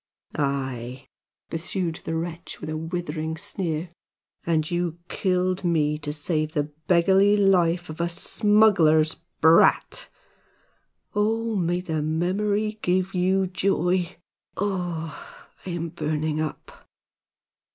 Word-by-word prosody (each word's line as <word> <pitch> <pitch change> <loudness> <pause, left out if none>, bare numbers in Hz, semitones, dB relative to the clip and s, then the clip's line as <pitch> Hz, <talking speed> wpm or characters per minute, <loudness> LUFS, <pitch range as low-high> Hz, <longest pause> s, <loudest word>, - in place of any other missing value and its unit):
"Aye," 130 -3 -3 0.5
pursued 165 0 -3
the 160 - -2
wretch, 165 0 -5
with 155 - -5
a - - -2
withering 160 -1 -3
sneer, 170 -1 -3 0.6
"and 160 -1 +1
you 175 -1 -1
killed 185 0 0
me 155 -4 +2
to 145 -1 -4
save 155 +1 -1
the 150 0 -1 0.2
beggarly 190 +4 +5
life 180 -3 +3
of 155 +2 -6
a 170 - 0
smuggler's 175 -5 +3 0.2
brat! 165 - +4 1.0
Oho! 225 +2 0
may 175 -1 0
the 160 -4 -2
memory 200 +7 0
give 185 +1 0
you 190 +1 +2
joy! 180 -1 0 0.4
Oh, 175 -5 -4 0.2
I - - -3
am 170 -1 -3
burning 155 0 -2
up!" 155 -2 -7
170 Hz, 110 wpm, -25 LUFS, 155-185 Hz, 1.0 s, beggarly